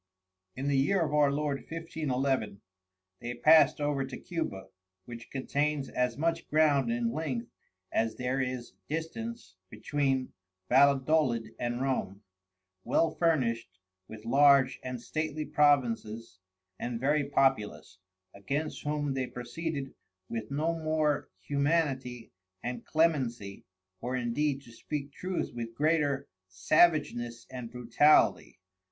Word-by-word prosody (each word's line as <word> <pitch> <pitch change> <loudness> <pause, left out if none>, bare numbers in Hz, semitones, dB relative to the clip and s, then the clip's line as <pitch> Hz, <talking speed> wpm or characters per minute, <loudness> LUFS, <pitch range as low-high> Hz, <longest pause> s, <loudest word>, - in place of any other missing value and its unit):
In 135 +2 -3
the 140 -1 +3
Year 185 +8 +2
of 150 -3 -1
our 145 -2 +4
Lord 145 -1 -1
1511. 135 -9 -2 0.6
They 120 +1 -5
passed 155 +3 +6
over 145 -2 0
to 135 0 -6
Cuba, 100 - -5 0.4
which 115 -1 -9
contains 140 +1 -1
as 125 -1 -1
much 165 +2 -1
ground 145 -5 +3
in 120 -1 0
length 130 -6 -3 0.4
as 115 0 0
there 130 +2 -1
is 125 -2 -4 0.2
distance 165 - -5
between 135 +4 -1 0.4
Valledolid 135 -3 +3
and 120 +1 -2
Rome, 105 -7 -2 0.6
well 165 -1 +2
furnished 115 - 0 0.3
with 110 0 -11
large 140 +1 +5
and 125 -1 -5
stately 155 +4 -3
Provinces 115 -9 +1 0.4
and 120 -1 -3
very 140 +2 +1
populous, 110 -9 0 0.3
against 140 +10 -3
whom 145 -1 -1
they 130 -1 -2
proceeded 135 +4 -5 0.3
with 115 -2 -5
no 155 +4 0
more 155 -2 0
humanity 135 - -1 0.3
and 125 +1 -4
Clemency, 130 -11 0 0.4
or 125 +2 -2
indeed 135 +3 -1
to 120 - -15
speak 140 +4 -5
truth 185 +4 -3
with 115 -1 -6
greater 145 -1 +1 0.2
Savageness 120 - +2
and 125 -3 -6
Brutality. 125 +5 +3
135 Hz, 120 wpm, -30 LUFS, 120-150 Hz, 0.6 s, passed